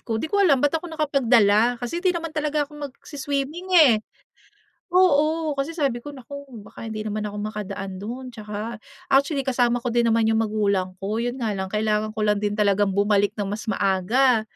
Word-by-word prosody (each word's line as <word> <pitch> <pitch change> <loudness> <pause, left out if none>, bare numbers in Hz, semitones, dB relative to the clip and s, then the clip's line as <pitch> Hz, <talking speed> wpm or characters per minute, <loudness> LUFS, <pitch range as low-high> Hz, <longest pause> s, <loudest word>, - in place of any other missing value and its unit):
ko, 225 -2 -3
di 315 - -4
ko 405 - +3
alam 290 -8 +4
ba't 290 - +3
ako 350 - -8
nakapagdala, 245 -7 +3
kasi 245 +8 -4
hindi 375 - +2
naman 330 -2 -5
talaga 300 -1 0
ako 290 - -20 0.2
magsi-swimming 285 +5 -5
eh. 295 -8 +8 1.0
Oo, 315 -3 +3
kasi 275 +3 -2
sabi 275 -8 -1
ko, 290 - -7
"Naku, 280 +1 -9 0.2
baka - - -10
hindi 215 -1 -4
naman 215 0 -3
ako 210 0 -5
makadaan 205 -2 -5
dun 250 +3 -7
'tsaka" 215 +1 -6 0.4
actually 275 0 +2
kasama 245 -2 +2
ko 240 -1 -3
din 240 - +4
naman 225 0 +3
'yung 225 0 +2
magulang 200 -4 0
ko, 210 +4 -2
'yun 245 +2 -3
nga 220 -4 -1
lang 190 -1 -4
kailangan 215 0 0
ko 215 - -6
lang 210 0 +1
din 205 +1 -1
talagang 205 -1 +3
bumalik 200 +1 +2
ng 205 - -1
mas 205 +2 -4
maaga. 215 +6 +2
235 Hz, 190 wpm, -23 LUFS, 210-280 Hz, 1.0 s, eh